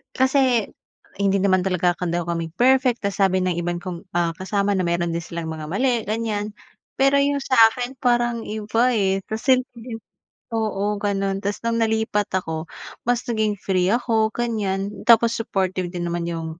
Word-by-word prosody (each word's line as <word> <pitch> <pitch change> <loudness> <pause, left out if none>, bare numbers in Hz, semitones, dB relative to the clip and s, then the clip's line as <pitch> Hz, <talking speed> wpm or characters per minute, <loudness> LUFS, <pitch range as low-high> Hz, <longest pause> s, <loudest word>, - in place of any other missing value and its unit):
kasi 260 -4 +2 0.5
hindi 200 0 +2
naman 185 -1 +3
talaga 180 -1 +1
ka 180 0 -4
daw 175 +1 -1
kami 165 -1 -3
perfect 255 0 +3
ta's 200 -1 -2
sabi 190 -1 +3
ng 185 -1 +1
ibang 175 0 -2
kong, 180 -1 -6
ah, 170 -1 +1
kasama 200 +3 -1
na 190 - +1
meron 170 0 0
din 170 - -2
silang 165 -1 -5
mga 155 -1 -6
mali 240 +5 +1
ganiyan. 215 -1 -2 0.4
Pero 275 +1 +4
'yung 280 0 +1
sa 260 - 0 0.2
akin 250 +2 -5
parang 240 -2 +1
iba, 220 +2 -1
eh, 195 -2 +1
kasi 255 +4 +2 0.2
'di 230 -1 -8 0.6
oo 210 -2 -1
ganun 195 -1 -1
ta's 200 +1 -2
nung 230 0 +1
nalipat 220 -2 0
ako 160 -2 -5 0.3
mas 245 +1 0
naging 220 -3 0
free 185 -1 +1
ako 225 -1 +1
ganiyan, 205 -4 -2
tapos 235 0 +5
supportive 190 -5 -2
din 175 -1 -4
naman 170 0 -2
'yung, 165 -1 -4
205 Hz, 170 wpm, -22 LUFS, 185-235 Hz, 0.6 s, tapos